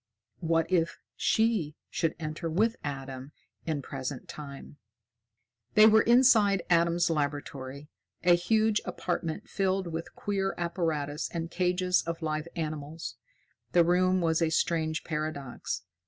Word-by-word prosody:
What 165 Hz, -1 st, +2 dB
if 170 Hz, -2 st, +1 dB, 0.2 s
she 220 Hz, -10 st, +1 dB, 0.2 s
should 165 Hz, -, 0 dB
enter 155 Hz, +1 st, -4 dB
with 220 Hz, +8 st, +2 dB
Adam 135 Hz, -1 st, -6 dB, 0.3 s
in 150 Hz, -4 st, -1 dB
Present 135 Hz, -1 st, -5 dB
Time? 145 Hz, -1 st, -9 dB, 1.0 s
They 215 Hz, 0 st, +9 dB
were 220 Hz, 0 st, +7 dB
inside 225 Hz, -6 st, +5 dB
Adam's 170 Hz, 0 st, +3 dB
laboratory, 145 Hz, -2 st, -3 dB, 0.4 s
a 175 Hz, 0 st, +6 dB
huge 215 Hz, +4 st, +2 dB
apartment 170 Hz, -2 st, -3 dB
filled 190 Hz, -1 st, 0 dB
with 165 Hz, -1 st, -6 dB
queer 195 Hz, -1 st, -1 dB
apparatus 160 Hz, -4 st, -2 dB
and 165 Hz, 0 st, -4 dB
cages 180 Hz, 0 st, +2 dB
of 165 Hz, 0 st, -3 dB
live 155 Hz, 0 st, -2 dB
animals. 155 Hz, 0 st, -5 dB, 0.6 s
The 175 Hz, -1 st, +6 dB
room 185 Hz, +1 st, +3 dB
was 165 Hz, 0 st, +2 dB
a 165 Hz, -, +3 dB
strange 160 Hz, 0 st, 0 dB
paradox. 150 Hz, -8 st, -4 dB
165 Hz, 125 wpm, -29 LUFS, 150-185 Hz, 1.0 s, They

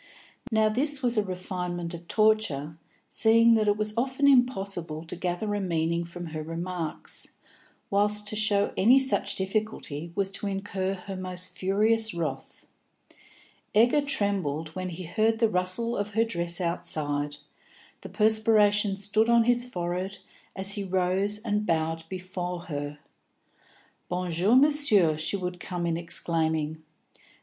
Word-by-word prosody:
Now 220 Hz, -1 st, +3 dB
this 270 Hz, +5 st, +1 dB
was 240 Hz, -1 st, +3 dB
a 215 Hz, -, +2 dB
refinement 180 Hz, -2 st, -4 dB
of 170 Hz, 0 st, -9 dB
torture, 215 Hz, -10 st, +1 dB, 0.3 s
seeing 230 Hz, 0 st, +4 dB
that 215 Hz, -2 st, +2 dB
it 205 Hz, 0 st, +3 dB
was 215 Hz, 0 st, -2 dB
often 265 Hz, +4 st, +1 dB
impossible 195 Hz, -, +2 dB
to 165 Hz, -, -6 dB
gather 180 Hz, +4 st, -2 dB
a 205 Hz, -, -1 dB
meaning 170 Hz, -1 st, -1 dB
from 175 Hz, +1 st, -8 dB
her 155 Hz, -, -3 dB
remarks, 165 Hz, 0 st, -4 dB, 0.6 s
whilst 210 Hz, +1 st, +1 dB
to 215 Hz, -, -3 dB
show 210 Hz, -1 st, +1 dB
any 240 Hz, +7 st, +5 dB
such 265 Hz, 0 st, +1 dB
difficulty 190 Hz, -6 st, -3 dB
was 195 Hz, -1 st, 0 dB
to 205 Hz, -, -2 dB
incur 195 Hz, -1 st, -2 dB
her 190 Hz, +1 st, -8 dB
most 185 Hz, -1 st, -7 dB
furious 215 Hz, +3 st, +2 dB
wrath. 165 Hz, -2 st, -5 dB, 1.1 s
Egger 240 Hz, +7 st, +5 dB
trembled 195 Hz, -, -1 dB
when 185 Hz, +3 st, -5 dB
he 180 Hz, +1 st, -7 dB
heard 220 Hz, +6 st, +1 dB
the 225 Hz, -1 st, +2 dB
rustle 185 Hz, +6 st, +1 dB
of 205 Hz, -1 st, -4 dB
her 225 Hz, -, +4 dB
dress 170 Hz, -5 st, -2 dB
outside, 150 Hz, -4 st, -2 dB, 0.6 s
the -, -, -9 dB
perspiration 210 Hz, -2 st, +3 dB
stood 210 Hz, +3 st, +1 dB
on 235 Hz, -1 st, +5 dB
his 245 Hz, +1 st, +2 dB
forehead 180 Hz, +2 st, -3 dB, 0.4 s
as 195 Hz, +1 st, +2 dB
he 200 Hz, 0 st, -1 dB
rose 190 Hz, +2 st, 0 dB
and 210 Hz, -2 st, 0 dB
bowed 165 Hz, 0 st, -1 dB
before 180 Hz, -1 st, -5 dB
her. 145 Hz, -2 st, -5 dB, 1.1 s
"Bon 180 Hz, 0 st, -2 dB
jour, 185 Hz, +8 st, +3 dB
Monsieur," 260 Hz, -, +5 dB
she 155 Hz, +6 st, -2 dB
would 180 Hz, -1 st, -5 dB
come 180 Hz, -1 st, -4 dB
in 165 Hz, -1 st, 0 dB
exclaiming. 160 Hz, -2 st, 0 dB
190 Hz, 140 wpm, -27 LUFS, 170-215 Hz, 1.1 s, any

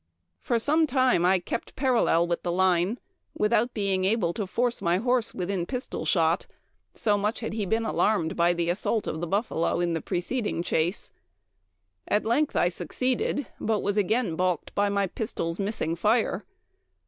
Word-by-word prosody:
M 85 Hz, +2 st, -51 dB
For 235 Hz, -, 0 dB
some 310 Hz, +7 st, +3 dB
time 255 Hz, -, +3 dB
I 190 Hz, +1 st, +4 dB
kept 180 Hz, +5 st, -5 dB
parallel 245 Hz, -, +2 dB
with 170 Hz, 0 st, -2 dB
the 175 Hz, -, -2 dB
line, 185 Hz, +4 st, +2 dB, 0.4 s
without 235 Hz, +3 st, +1 dB
being 195 Hz, -3 st, 0 dB
able 190 Hz, -3 st, +1 dB
to 205 Hz, -1 st, -3 dB
force 240 Hz, +5 st, -1 dB
my 170 Hz, +1 st, +2 dB
horse 245 Hz, +2 st, +1 dB
within 180 Hz, -1 st, -2 dB
pistol 250 Hz, -1 st, -4 dB
shot, 165 Hz, -2 st, +2 dB, 0.5 s
so 205 Hz, -2 st, +1 dB
much 210 Hz, +4 st, -1 dB
had 225 Hz, -, -4 dB
he 210 Hz, -3 st, -2 dB
been 225 Hz, +3 st, 0 dB
alarmed 200 Hz, -7 st, +1 dB
by 170 Hz, +1 st, +3 dB
the 170 Hz, 0 st, 0 dB
assault 210 Hz, +4 st, -1 dB
of 160 Hz, -, -4 dB
the 175 Hz, -, -2 dB
buffalo 195 Hz, -3 st, 0 dB
in 175 Hz, -1 st, 0 dB
the 165 Hz, -, -2 dB
preceding 205 Hz, 0 st, -2 dB
chase. 175 Hz, +3 st, 0 dB, 1.0 s
At 210 Hz, -, +1 dB
length 275 Hz, +7 st, +1 dB
I -, -, +3 dB
succeeded, 255 Hz, -, -1 dB
but 215 Hz, -2 st, 0 dB
was 200 Hz, -, 0 dB
again 210 Hz, -2 st, +1 dB
balked 180 Hz, -1 st, -1 dB
by 205 Hz, 0 st, +2 dB
my 200 Hz, 0 st, +1 dB
pistols 175 Hz, -3 st, -3 dB
missing 195 Hz, -5 st, -1 dB
fire. 220 Hz, +6 st, +1 dB
200 Hz, 170 wpm, -26 LUFS, 175-230 Hz, 1.0 s, I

